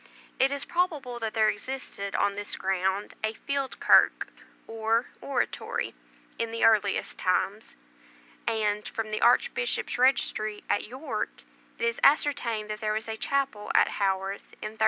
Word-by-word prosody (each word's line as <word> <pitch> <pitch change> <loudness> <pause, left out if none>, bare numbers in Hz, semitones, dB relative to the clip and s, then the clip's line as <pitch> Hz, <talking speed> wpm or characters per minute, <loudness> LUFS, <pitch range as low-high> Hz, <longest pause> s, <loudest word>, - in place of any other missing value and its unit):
It 265 - +5
is 280 0 -3
probable 310 -9 -1
that 225 -1 -3
there 220 -1 +4
existed 210 -3 -4
on 200 0 +2
this 205 +1 -2
ground, 190 +1 -1
a 220 0 -1
"field 280 +1 -3
kirk," - - +5 0.4
or 225 +1 0 0.2
oratory, 275 - -2 0.5
in 230 - 0
the 230 0 -3
earliest 210 -3 +2
times; 195 +3 0 0.7
and, 210 -1 0
from 220 -1 -4
the 215 - -2
Archbishop's 245 - +2
registry 215 -5 +2
at - - 0
York, 260 +7 -5 0.3
it 465 - -1
is 465 - 0
ascertained 275 -7 +3
that 215 +1 -5
there 215 -1 0
was 220 +1 -3
a 220 - -3
chapel 270 -3 -1
at - - +6
Haworth 195 0 -2
in 215 - -7
1317. 220 - -21
220 Hz, 150 wpm, -28 LUFS, 210-265 Hz, 0.7 s, at